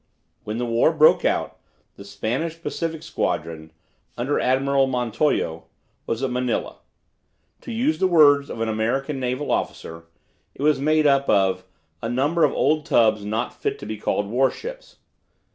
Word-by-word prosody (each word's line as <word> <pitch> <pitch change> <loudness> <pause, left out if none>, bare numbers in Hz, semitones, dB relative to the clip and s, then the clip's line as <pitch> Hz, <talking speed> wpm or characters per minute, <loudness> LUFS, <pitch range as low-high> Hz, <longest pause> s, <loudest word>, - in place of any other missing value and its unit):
When 105 +1 -4
the 120 - -2
war 115 +6 +3
broke 155 -1 +5
out - - -1 0.4
the - - -11
Spanish 125 +11 -3
Pacific 165 -1 -4
Squadron, 80 - -3 0.5
under 130 +5 0
Admiral 135 +1 +2
Montojo, 125 - -1 0.4
was 115 +3 -2
at 130 - -1
Manila. 125 -1 -2 0.8
To - - -8
use 255 +8 0
the 190 - +3
words 145 -5 +5
of 115 - -6
an 115 - 0
American 125 +6 -1
naval 130 +3 -2
officer, 85 0 -3 0.5
it - - -6
was 150 -2 +3
made 155 +1 +2
up 140 -1 +3
of 95 -2 +2 0.4
"a 115 - -3
number 145 +7 +1
of - - +4
old 155 0 +1
tubs 110 -3 +3
not 110 +4 -3
fit - - -3
to - - -9
be 110 +1 -5
called 105 0 -1
warships." 135 - -2
130 Hz, 155 wpm, -23 LUFS, 110-150 Hz, 0.8 s, broke